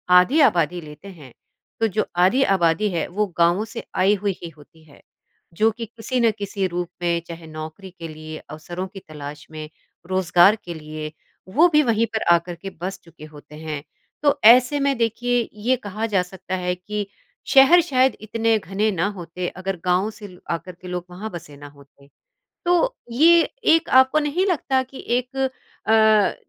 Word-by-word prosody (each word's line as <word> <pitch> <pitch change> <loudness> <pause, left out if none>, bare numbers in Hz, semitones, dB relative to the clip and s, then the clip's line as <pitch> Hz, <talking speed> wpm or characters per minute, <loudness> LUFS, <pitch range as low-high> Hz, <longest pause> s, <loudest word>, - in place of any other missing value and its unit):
आधी 205 - +5
आबादी 175 - +2
लेते 150 +4 -12
हैं, 150 -10 -13 0.5
तो 225 - +3
जो 215 +1 -1
आधी 185 +10 +4
आबादी 175 +4 +2
है 170 -3 -2
वो 210 +4 -1
गाँवों 175 +5 +3
से 230 +1 -8
आई 190 +2 +4
हुई 200 0 -1
ही 170 - -6
होती 160 +1 -20
है। 140 - -18 0.5
जो 215 +6 +3
कि 230 +1 -6
किसी 235 +4 -4
न 230 -2 +4
किसी 200 -1 -2
रूप 175 -1 -4
में 170 -1 0
चाहे 165 -1 -9
नौकरी 155 +4 -8
के 170 -2 -9
लिए, 155 0 -8
अवसरों 175 +4 -6
की 195 +1 -11
तलाश 150 -3 -9
में, 155 -1 -7 0.4
रोज़गार 185 +1 +4
के 175 - -5
लिए, 155 -1 -7 0.4
वो 300 - +5
भी 300 - +5
वहीं 230 -3 +2
पर 220 - 0
आ 170 - +6
कर 175 +1 -8
के 195 +3 -8
बस 190 +1 -4
चुके 165 -2 -14
होते 150 0 -13
हैं। 155 -2 -6 0.4
तो 290 0 +3
ऐसे 250 +5 +7
में 275 -2 +1
देखिए 240 +1 0
ये 255 +3 +3
कहा 215 +3 -3
जा 195 -4 +2
सकता 185 0 -6
है 180 -1 -2
कि 205 +3 -5 0.5
शहर 275 +6 +8
शायद 265 -6 +2
इतने 225 +1 +1
घने 200 +5 -1
ना 180 0 0
होते 175 +1 -5
अगर 190 0 -3
गाँव 180 +4 +2
से 210 -1 -11
ल 180 -2 -15
आकर 170 +2 -4
के 180 - -10
लोग 180 -1 -4
वहाँ 195 +5 -7
बसे 165 -4 -10
न 145 - -15
होते। 140 0 -21 0.6
तो 355 +8 +2 0.2
ये 330 +6 +6 0.3
एक 330 - +3
आपको 260 +3 +6
नहीं 305 +5 0
लगता 275 -7 +1
कि 260 +1 -11
एक 250 +2 -7
अ, 220 -5 +2
190 Hz, 185 wpm, -22 LUFS, 170-230 Hz, 0.6 s, शहर